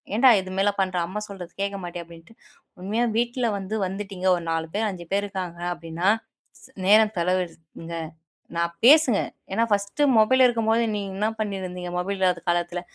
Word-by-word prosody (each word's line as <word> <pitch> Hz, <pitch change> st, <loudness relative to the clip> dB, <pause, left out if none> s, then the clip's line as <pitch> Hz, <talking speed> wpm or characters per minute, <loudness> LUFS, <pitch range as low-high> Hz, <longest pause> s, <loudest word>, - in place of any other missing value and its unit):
"ஏன்டா! 255 Hz, +4 st, +6 dB
இதுமேல 190 Hz, +2 st, 0 dB
பண்ற? 185 Hz, -1 st, 0 dB
அம்மா 210 Hz, +3 st, -4 dB
சொல்றது 185 Hz, -4 st, -9 dB
கேட்க 200 Hz, 0 st, -2 dB
மாட்டியா?" 175 Hz, 0 st, -6 dB
அப்பிடின்ட்டு 170 Hz, +4 st, -15 dB, 0.5 s
உண்மையா 215 Hz, +6 st, 0 dB
வீட்ல 240 Hz, +1 st, 0 dB
வந்து 195 Hz, +2 st, -4 dB
வந்துட்டீங்க 195 Hz, -1 st, -4 dB
ஒரு 175 Hz, -, -5 dB
4 165 Hz, 0 st, -1 dB
பேர், 220 Hz, +1 st, +1 dB
5 175 Hz, -3 st, -7 dB
பேர் 200 Hz, +1 st, +2 dB
இருக்காங்க 185 Hz, -4 st, -5 dB
அப்பிடின்னா, 170 Hz, +2 st, -2 dB, 0.5 s
ஸ் -, -, -15 dB, 0.2 s
நேரம் 215 Hz, +1 st, +6 dB
செலவிடுங்க. 170 Hz, -2 st, -3 dB, 0.6 s
நான் 170 Hz, 0 st, 0 dB
பேசுங்க, 275 Hz, -6 st, +7 dB, 0.3 s
ஏனா, 225 Hz, +4 st, +2 dB
ஃபர்ஸ்ட்டு 200 Hz, +7 st, 0 dB
மொபைல் 260 Hz, +4 st, +5 dB
இருக்கும்போது 230 Hz, -1 st, +2 dB
நீங்க 200 Hz, -2 st, -4 dB
என்ன 215 Hz, +2 st, +1 dB
பண்ணியிருந்தீங்க? 185 Hz, -4 st, -4 dB
மொபைல் 195 Hz, +2 st, -2 dB
இல்லாத 180 Hz, -2 st, +2 dB
காலத்துல. 175 Hz, 0 st, 0 dB
195 Hz, 160 wpm, -24 LUFS, 175-215 Hz, 0.6 s, பேசுங்க